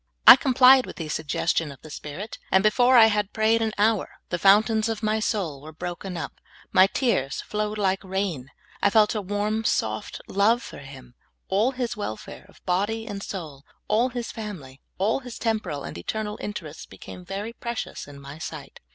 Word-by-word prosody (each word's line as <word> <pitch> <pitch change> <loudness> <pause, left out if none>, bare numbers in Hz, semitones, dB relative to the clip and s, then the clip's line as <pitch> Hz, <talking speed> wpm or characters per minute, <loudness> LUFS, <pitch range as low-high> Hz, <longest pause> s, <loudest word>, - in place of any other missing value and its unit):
I - - +13
complied 260 0 +6
with - - -8
the 160 -3 -6
sug 155 0 -3
gestion 165 0 0
of 140 - -14
the 155 - -11
Spirit, 150 +10 -7
and 190 0 +4
before 245 +4 +5
I 225 - +9
had 210 -2 +1
pra3'ed 220 +1 +2
an 220 -1 0
hour 215 0 +2 0.2
the 175 - -2
fountains 215 +3 +4
of 225 -1 -4
my 215 0 +1
soul 185 -11 -2
were 155 +2 -10
broken 175 +3 -6
up, 165 - -7 0.3
my 185 +1 +6
tears 195 - 0
flowed 210 0 -3
like 195 -2 0
rain; 190 -8 -3 0.3
I - - +4
felt 210 0 +4
a 215 - -2
warm, 205 +3 -1
soft 110 - -1
love 215 +5 +2
for - - -9
him; 130 -3 -12 0.4
all 205 +6 +3
his 245 -2 -3
welfare 155 - -7
of - - -22
body 205 +5 0
and 205 -3 -6
soul, 155 -9 -7 0.2
all 230 +4 +2
his 240 -2 -5
family, 165 -12 -8 0.2
all 205 +6 +1
his 245 -3 -9
tem 225 -2 0
poral 145 -9 -6
and - - -8
eternal 210 - -4
interests, 165 -7 -7
became 180 - -11
very 200 +5 -5
precious 235 -8 -5
in 145 -1 -11
my 140 +2 -10
sight. - - -8
205 Hz, 190 wpm, -25 LUFS, 160-220 Hz, 0.4 s, I